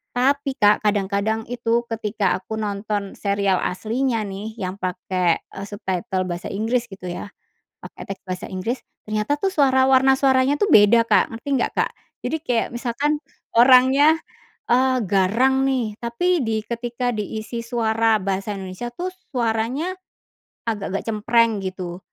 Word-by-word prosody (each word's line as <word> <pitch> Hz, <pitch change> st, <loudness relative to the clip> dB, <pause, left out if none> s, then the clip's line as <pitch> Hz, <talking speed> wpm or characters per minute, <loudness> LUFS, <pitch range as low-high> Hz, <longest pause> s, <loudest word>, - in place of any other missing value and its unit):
Tapi, 275 Hz, +2 st, +1 dB
Kak, 205 Hz, 0 st, +5 dB
kadang-kadang 205 Hz, +2 st, 0 dB
itu 235 Hz, -1 st, 0 dB
ketika 210 Hz, -3 st, 0 dB
aku 205 Hz, +4 st, -6 dB
nonton 205 Hz, -1 st, -3 dB
serial 200 Hz, -2 st, +1 dB
aslinya 225 Hz, +5 st, -1 dB
nih, 205 Hz, +3 st, -6 dB
yang 185 Hz, -2 st, -3 dB
pakai, 180 Hz, -1 st, 0 dB
eee, 195 Hz, -, -9 dB
subtitle 190 Hz, -1 st, -2 dB
bahasa 175 Hz, 0 st, -4 dB
Inggris, 230 Hz, +4 st, -1 dB
gitu 190 Hz, -2 st, -9 dB
ya, 175 Hz, -, -6 dB, 0.6 s
pakai -, -, -9 dB
teks 195 Hz, -, -6 dB
bahasa 185 Hz, 0 st, -4 dB
Inggris, 210 Hz, +7 st, -3 dB, 0.3 s
ternyata 215 Hz, +7 st, -1 dB
tuh 390 Hz, -, +1 dB
suara 265 Hz, -5 st, +4 dB
warna 265 Hz, 0 st, +5 dB
suaranya 265 Hz, 0 st, +3 dB
tuh 410 Hz, -, +2 dB
beda, 215 Hz, +2 st, +7 dB
Kak, 220 Hz, -, +3 dB
ngerti 230 Hz, +5 st, -7 dB
nggak, -, -, 0 dB
Kak? -, -, +1 dB, 0.3 s
Jadi 320 Hz, -, 0 dB
kayak 240 Hz, -5 st, +1 dB
misalkan 275 Hz, +5 st, -1 dB, 0.4 s
orangnya, 260 Hz, +5 st, +6 dB, 0.5 s
eee, 260 Hz, +1 st, +4 dB
garang 235 Hz, +8 st, +3 dB
nih, 245 Hz, -6 st, -1 dB
tapi 345 Hz, +10 st, +1 dB
di 220 Hz, -1 st, 0 dB
ketika 240 Hz, +2 st, -2 dB
diisi 220 Hz, +2 st, -4 dB
suara 225 Hz, -1 st, +2 dB
bahasa 195 Hz, +2 st, -2 dB
Indonesia 190 Hz, +5 st, -6 dB
tuh 360 Hz, +5 st, -3 dB, 0.2 s
suaranya 240 Hz, +6 st, 0 dB, 0.8 s
agak-agak 200 Hz, -3 st, -2 dB
cempreng, 225 Hz, 0 st, +2 dB
gitu. 180 Hz, -2 st, -5 dB
225 Hz, 140 wpm, -22 LUFS, 200-255 Hz, 0.8 s, beda